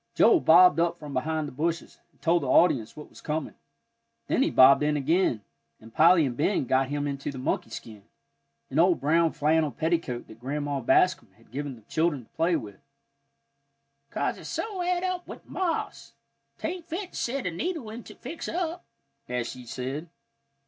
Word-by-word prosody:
Joel 400 - +6
bobbed 175 - +6
out 170 0 +1
from 150 -3 -9
behind 155 +3 -1
the - - -8
bushes, 165 +5 -3
and - - -34
told 170 +1 +3
the 140 - -3
audience 135 -5 +3
what 150 - -9
was - - -15
coming; 155 -1 -3 0.7
then - - +1
he - - +3
bobbed 130 +2 +7
in 150 0 +1
again, 145 - +1 0.4
and 110 +1 -15
Polly 165 0 +6
and 125 -3 -3
Ben 150 +3 +1
got 130 +2 +2
him 145 0 -2
into 140 0 -3
the 135 - -9
monkey 130 - -2
skin, 105 -3 -10 0.7
an 150 - 0
old 175 0 +4
brown 160 +4 +3
flannel 155 +1 +2
petticoat 160 -4 -2
that 110 - -14
Grandma 145 +2 -3
Bascom 130 - +2
had - - -24
given 140 0 -4
the 115 - -18
children 155 0 0
to - - -25
play 165 +2 +1
with, 100 -10 -6 1.3
"'Cause - - -2
it's - - -9
so 405 -5 -3
et 355 0 0
up 365 -1 -3
with - - -10
moths, 350 -4 -3 0.4
'tain't 345 0 -5
fit 355 +3 -5
to - - -15
set 260 +2 -2
a 180 - -1
needle 295 - -4
into 230 +2 -10
to - - -31
fix 320 +7 -6
up," 345 0 -3 0.5
as 125 -1 -2
she 125 -1 -9
said. 135 +7 -5
155 Hz, 185 wpm, -27 LUFS, 135-185 Hz, 1.3 s, bobbed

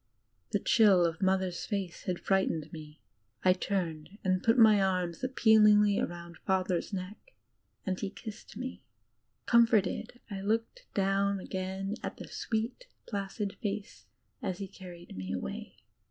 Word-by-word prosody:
The - - +2
chill 200 -6 +5
of 165 -1 -2
Mother's 190 -2 +1
face 195 -5 -3
had 180 -1 -1
frightened 165 -5 0
me; 155 -1 -10 0.4
I 185 - +7
turned 180 -2 -3
and 185 -1 +2
put 230 +2 +3
my 215 -3 +7
arms 180 0 0
appealingly 210 -5 +5
about 170 -1 -4
Father's 185 -1 0
neck 200 - -7 0.5
and 185 -1 -1
he 200 - -2
kissed 215 0 -10
me. 255 +2 -5 0.7
G^mforted, 230 -1 +3
I 195 -1 -4
looked 225 - -1
down 195 0 +2
again 190 +1 -3
at - - -5
the - - -8
sweet, 235 - -3 0.2
placid 200 -1 -3
face 205 -1 -4 0.3
as 185 - -2
he 195 0 -5
carried 175 - -11
me 95 0 -4
away. 80 -9 -6
195 Hz, 140 wpm, -31 LUFS, 180-210 Hz, 0.7 s, I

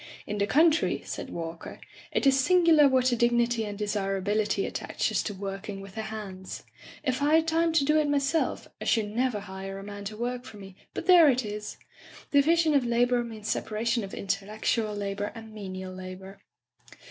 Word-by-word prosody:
"In 210 0 -4
the 200 - +1
country," 315 +6 +3
said - - -5
Walker, 165 0 -7 0.3
"it - - 0
is 270 0 +5
singular 335 -1 +5
what 260 -1 +3
a - - +2
dignity 235 -1 +2
and 205 -1 -6
desirability 205 0 0
at - - -5
taches - - -1
to 210 - -4
working 195 +1 -5
with 195 -1 -10
the 220 - -4
hands. 205 -4 -7 0.4
If 260 -1 -1
I 295 +2 +4
had 320 0 +3
time 330 +1 +2
to 305 -4 +3
do 305 +2 +4
it 300 -1 +1
myself, 285 +3 0
I - - -4
should 215 -3 +1
never 240 -2 0
hire 195 0 -7
a 195 - -8
man 205 0 -8
to 210 +1 -6
work 245 +1 -3
for 225 -5 -11
me, 195 -2 -11 0.2
but - - -4
there 345 -4 +8
it 255 -2 +1
is! 210 0 -6 0.5
Division 315 +2 +4
of 280 -3 +4
labor 240 +1 +2
means 220 -2 -8
separation 230 +2 -1
of 195 - -7
intellectual 210 +2 -1
la 200 -1 -3
bor 205 +1 -3
and 225 -1 -10
menial 190 -3 -6
labor. 185 +1 -9
220 Hz, 190 wpm, -28 LUFS, 200-265 Hz, 0.5 s, there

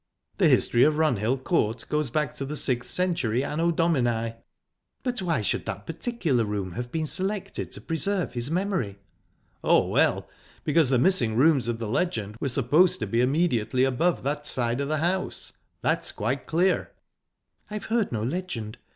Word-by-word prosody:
The - - +5
history 120 - +3
of 155 0 +4
Runhill 130 -4 +1
Court 115 -9 0
goes 150 -3 0
back 150 +1 -1
to - - -3
the 145 +2 -4
sixth 125 -4 +1
century 140 -10 0
Anno 165 +4 0
Domini." 120 -9 +1 0.7
"But 245 -4 -2
why 165 - 0
should - - -1
that 100 +2 -5
particular 165 - -1
room 105 -3 -3
have 120 +6 -5
been 160 -1 -1
selected 195 +4 -3
to - - -7
preserve 175 -1 -1
his 120 +2 0
memory?" 175 - -1 0.7
"Oh, - - +4
well, - - +2 0.4
because 150 -2 +3
the 130 - +3
missing 120 - +2
rooms 135 -1 +4
of 120 -1 -1
the 115 -1 -4
legend 110 - -1
were 140 - -1
supposed 145 +8 +3
to - - 0
be 115 +4 +1
immediately 130 -3 +1
above 135 +7 +1
that 145 +2 -2
side 120 +1 0
of 140 - -2
the 155 +1 0
house. 180 +4 -1 0.3
That's - - 0
quite 125 +6 -3
clear." 180 +3 +1 0.8
"I 210 - -6
have 210 - -5
heard 230 -4 +1
no 110 -3 -2
legend. 120 -7 -4
140 Hz, 170 wpm, -26 LUFS, 120-170 Hz, 0.8 s, The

